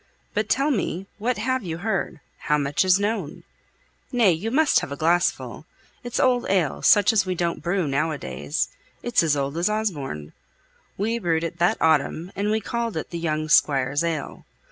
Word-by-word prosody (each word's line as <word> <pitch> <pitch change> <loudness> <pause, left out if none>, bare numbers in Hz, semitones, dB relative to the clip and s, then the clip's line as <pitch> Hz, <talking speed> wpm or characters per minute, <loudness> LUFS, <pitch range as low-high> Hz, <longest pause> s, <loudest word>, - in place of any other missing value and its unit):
But 210 +1 -1
tell 275 +3 +2
me; 195 -5 -2
what 240 +2 0
have 260 +4 0
you 165 -5 -5
heard? 185 -5 -2 0.2
how 150 - +1
much 145 +2 +1
is 185 +1 +4
known? 205 -6 -3 0.7
Nay, 235 -7 +4
you 175 +7 -2
must 300 +5 +3
have - - -6
a - - -3
glass 170 +3 +3
full. - - -10 0.4
It's 245 0 -3
old 250 -2 +2
ale, 185 -7 +1
such 205 +2 +5
as 200 -4 +2
we 185 - -1
don't 170 -1 -2
brew 175 -1 0
now 145 +4 0
a 155 - -3
days; 150 +2 -3 0.3
it's 240 0 +2
as 155 -3 +2
old 140 +2 -2
as 175 +4 +1
Osborne. 145 - -3 0.6
We 225 +4 -1
brewed 165 -5 0
it 170 +1 -5
that 175 +1 +3
autumn, 160 +3 +1
and 205 +1 -1
we 215 +1 +2
called 230 -1 -3
it - - -5
the 170 - -4
young 155 -2 -1
squire's 140 0 +3
ale. 165 -4 -3
175 Hz, 190 wpm, -24 LUFS, 155-215 Hz, 0.7 s, such